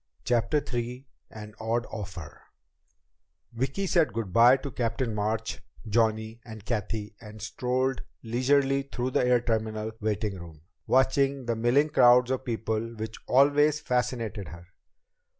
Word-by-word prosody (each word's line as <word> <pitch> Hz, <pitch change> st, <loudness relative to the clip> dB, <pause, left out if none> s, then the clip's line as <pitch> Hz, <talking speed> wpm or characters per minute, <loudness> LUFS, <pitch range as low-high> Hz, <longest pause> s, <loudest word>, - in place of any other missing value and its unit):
CHAPTER 120 Hz, +5 st, +1 dB
III 120 Hz, +2 st, -3 dB, 0.2 s
An 105 Hz, -1 st, -10 dB
Odd 115 Hz, +2 st, -1 dB
Offer 95 Hz, -7 st, -8 dB, 1.1 s
Vicki 135 Hz, +11 st, -2 dB
said 165 Hz, -, +2 dB
good 110 Hz, -5 st, -4 dB
by 120 Hz, +4 st, +7 dB
to 140 Hz, +1 st, -7 dB
Captain 120 Hz, 0 st, -2 dB
March, 105 Hz, +1 st, -2 dB, 0.3 s
Johnny, 110 Hz, +1 st, 0 dB
and 110 Hz, -3 st, -11 dB
Cathy 105 Hz, -2 st, -3 dB
and 105 Hz, -1 st, -11 dB
strolled 125 Hz, +5 st, -1 dB, 0.2 s
leisurely 135 Hz, +4 st, +2 dB
through 130 Hz, -2 st, -4 dB
the -, -, +2 dB
air 125 Hz, -1 st, +3 dB
terminal 110 Hz, -2 st, -2 dB
waiting 105 Hz, -2 st, -2 dB
room, 80 Hz, -3 st, -12 dB, 0.3 s
watching 135 Hz, 0 st, +2 dB
the 115 Hz, -1 st, 0 dB
milling 120 Hz, +7 st, +2 dB
crowds 125 Hz, -3 st, +5 dB
of 130 Hz, 0 st, -2 dB
people 115 Hz, -1 st, -2 dB
which 110 Hz, 0 st, -6 dB
always 145 Hz, +3 st, +4 dB
fascinated 125 Hz, -, -2 dB
her. 85 Hz, +1 st, -11 dB
115 Hz, 135 wpm, -27 LUFS, 110-130 Hz, 1.1 s, by